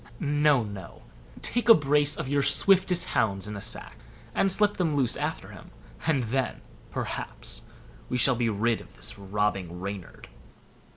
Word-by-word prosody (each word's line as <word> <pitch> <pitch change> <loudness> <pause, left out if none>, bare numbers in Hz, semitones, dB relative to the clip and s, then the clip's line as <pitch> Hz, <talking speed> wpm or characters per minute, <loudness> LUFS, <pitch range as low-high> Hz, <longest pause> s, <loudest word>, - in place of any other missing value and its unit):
No, 145 -3 +3
no; 100 -5 -9 0.4
take 240 0 0
a 230 - +11
brace 145 0 +2
of - - -4
your 140 +1 +1
swiftest 185 +2 +3
hounds 100 -2 0
in 105 - -5
a 100 - -6
sack, - - -3 0.4
and 195 +9 +2
slip 205 +2 +2
them 165 -5 0
loose 130 -4 +2
after - - -4
him; - - -12 0.4
and 145 -6 +2
then, 130 +4 -2 0.3
perhaps, - - -4 0.4
we 125 - 0
shall 125 +1 +5
be 120 -1 0
rid 110 +2 0
of - - -17
this - - -1
robbing 95 -3 -2
Reynard." 100 -1 -7
125 Hz, 160 wpm, -27 LUFS, 105-150 Hz, 0.4 s, a